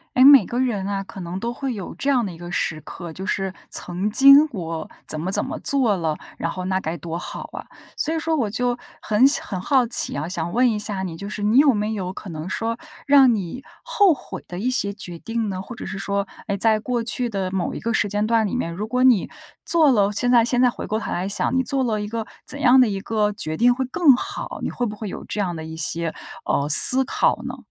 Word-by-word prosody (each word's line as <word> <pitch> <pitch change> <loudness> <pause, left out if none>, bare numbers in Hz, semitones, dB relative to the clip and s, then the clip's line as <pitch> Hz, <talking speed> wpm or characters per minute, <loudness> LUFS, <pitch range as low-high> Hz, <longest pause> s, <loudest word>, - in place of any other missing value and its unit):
哎， 255 - +5
每 275 -6 +9
个 240 - -3
人 220 -7 -1
啊， 195 -1 -2
可 195 - -11
能 175 +2 -5
都 235 +3 -3
会 270 0 -4
有 195 -5 -7
这 280 - -2
样 250 -4 +2
的 195 - -5
一 165 - -11
个 175 +1 -9
时 160 -2 -2
刻， 170 +1 -9
就 190 - -7
是 195 -2 -2 0.2
曾 180 +4 -1
经 275 +6 +7
我 165 -6 -5 0.2
怎 155 - -2
么 180 +3 -3
怎 - - 0
么 - - -5
做 255 -7 +3
了， 160 -4 -2 0.2
然 165 - -2
后 185 +2 -5
那 190 0 0
该 170 -2 -4
多 165 +2 -5
好 - - -7
啊， - - -8 0.3
所 315 - -1
以 - - -1
说 320 0 -1
我 240 -8 0
就 245 +3 -1 0.2
很 215 +5 +4
想 280 - 0
很 190 - -4
好 260 +5 +2
奇 230 - -1
啊， 145 +3 -3
想 170 -1 -4
问 250 +4 +3
一 215 -2 -1
下 205 -3 -3
你， 175 -3 -5
就 200 +5 -7
是 210 0 -5
你 215 +4 +3
有 285 -1 +6
没 210 0 -2
有 185 -4 -4
可 190 - -9
能 160 +1 -6
说 230 +2 -2 0.3
让 275 -3 +6
你 200 +6 -5 0.2
后 410 -6 +3
悔 270 - -9
的 175 - -7
一 240 +6 0
些 205 -5 0
决 175 -5 -9
定 225 -2 -3
呢？ 185 -1 -4
或 235 +5 -9
者 - - -8
是 205 - -6
说， 200 0 -2 0.2
诶， 200 -2 -1
在 220 +1 +3
过 240 +1 -2
去 240 +1 -2
的 195 -4 -3
某 185 -2 -2
一 - - -5
个 230 - -2
时 210 - +1
间 205 +1 -1
段 225 0 +2
里 205 - -3
面， 170 -9 -2
如 205 +5 -5
果 250 +2 0
你 245 -7 +4 0.4
做 320 -4 +4
了 205 -4 +2
现 245 +4 0
在 240 -2 +6
现 240 +1 0
在 250 - +5
回 - - -7
过 215 - -1
头 - - -5
来 180 +2 -2
想， 200 +5 -1
你 260 - +3
做 270 +1 -1
了 220 -4 -1
一 210 - -4
个 225 +1 -4 0.2
怎 285 - -3
样 260 -1 +6
的 250 - +4
一 195 -1 -3
个 210 0 0
决 155 -7 -4
定 245 +6 +4
会 260 +1 -2
更 280 +1 +4
好， - - -6
你 - - -2
会 245 - -2
不 210 - -6
会 210 -1 -6
有 - - -7
这 - - -5
样 180 -4 -1
的 160 - -6
一 160 0 -8
些， 165 +1 -1 0.3
呃， 140 - 0
思 260 - +8
考 - - +1
呢？ 255 0 -6
210 Hz, 280 characters per minute, -22 LUFS, 185-250 Hz, 0.4 s, 每